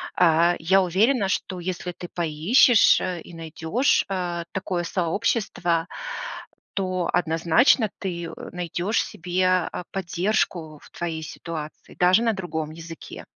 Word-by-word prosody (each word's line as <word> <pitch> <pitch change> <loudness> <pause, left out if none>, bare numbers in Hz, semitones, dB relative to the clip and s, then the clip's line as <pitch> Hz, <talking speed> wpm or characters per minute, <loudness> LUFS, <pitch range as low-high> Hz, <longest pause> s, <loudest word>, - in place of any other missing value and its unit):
А, 170 0 +4
я 190 +4 +4
уверена, 200 +4 +2
что 185 -1 -2
если 180 0 -4
ты 175 0 -9
поищешь, 175 - +5
э, 180 -2 -3
и 175 - -13
найдешь, 165 - 0
а, 175 -3 -2
такое 185 -2 -2
сообщество, 175 -1 0 0.9
то 185 -3 -1
однозначно 175 - +3
ты, 175 -3 -4
э, 165 - -6 0.2
найдешь 180 +4 -1
себе, 180 +2 -2 0.3
а, - - -5
поддержку 175 -4 -1
в - - -16
твоей 165 -2 -4
ситуации, 155 -1 -8
даже 180 +4 +5
на 225 - +2
другом 160 -5 -4
языке. 165 0 -9
175 Hz, 125 wpm, -24 LUFS, 165-190 Hz, 0.9 s, поищешь